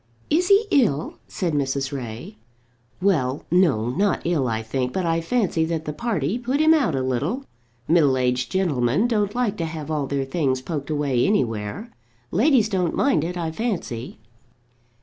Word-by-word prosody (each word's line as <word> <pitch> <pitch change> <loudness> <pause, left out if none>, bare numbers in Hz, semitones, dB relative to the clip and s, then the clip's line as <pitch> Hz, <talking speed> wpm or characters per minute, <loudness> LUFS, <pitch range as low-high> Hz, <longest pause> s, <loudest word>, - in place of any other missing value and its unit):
"Is 350 +4 +3
he 405 +3 +5
ill?" 215 - +1
asked 170 -4 -2
Mrs. 135 -1 -1
Ray. 130 - -7 0.6
"Well, 145 -8 +1
no; 155 -11 +3
not 195 +6 0
ill, 160 -6 +1
I 110 -1 -2
think, 125 +3 -2
but 185 - -1
I 165 0 +1
fancy 175 -3 0
that 160 -1 -3
the 150 - -3
party 205 - -1
put 255 +4 -1
him 315 +1 +6
out 270 - +2
a 130 - -1
little. 145 - -2 0.4
Middle 150 -6 +4
aged 125 0 0
gentlemen 160 - +1
don't 210 -3 0
like 235 -4 0
to 165 - -2
have 160 -1 -6
all 150 -3 -1
their 140 -1 -1
things 135 -2 0
poked 140 +2 -5
away 145 -5 +1
anywhere. 120 - -1 0.4
Ladies 240 - +4
don't 185 -5 -1
mind 265 - +2
it, 180 +2 -3
I 165 -2 -2
fancy." 165 - -4
165 Hz, 170 wpm, -23 LUFS, 135-205 Hz, 0.6 s, him